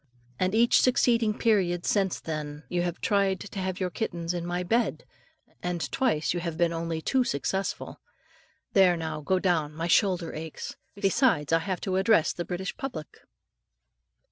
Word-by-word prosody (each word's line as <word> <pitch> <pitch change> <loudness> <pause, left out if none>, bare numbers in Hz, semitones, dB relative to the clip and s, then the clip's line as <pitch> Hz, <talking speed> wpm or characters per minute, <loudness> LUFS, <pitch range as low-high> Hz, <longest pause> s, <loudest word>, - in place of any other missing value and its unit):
And 185 +3 +1
each 235 +1 +5
succeeding 230 -3 +3
period 185 -6 +2
since 195 -3 +1
then, 150 -1 -5
you 175 -1 0
have 175 -1 -3
tried 195 -2 +2
to 205 -1 -7
have 185 0 -3
your 185 -2 -1
kittens 170 -4 -3
in 175 -1 -3
my 175 +1 -1
bed, 230 +6 0 0.6
and 180 -2 -3
twice 195 -14 +1
you 175 - -2
have 170 -2 -4
been 170 -1 +2
only 165 -1 -3
too 260 -1 +2
successful. 190 - -3 0.7
There, 185 -3 +5
now, 160 -2 -4
go 185 +6 +1
down, 165 -5 0
my 165 +1 -3
shoulder 180 -1 +2
aches; 160 0 -6 0.2
besides, 195 - +2
I 165 - +5
have 180 +2 -3
to 190 -2 -1
address 190 -3 +3
the 175 - -4
British 185 +1 -4
public. 260 - -6
180 Hz, 165 wpm, -27 LUFS, 165-200 Hz, 0.7 s, each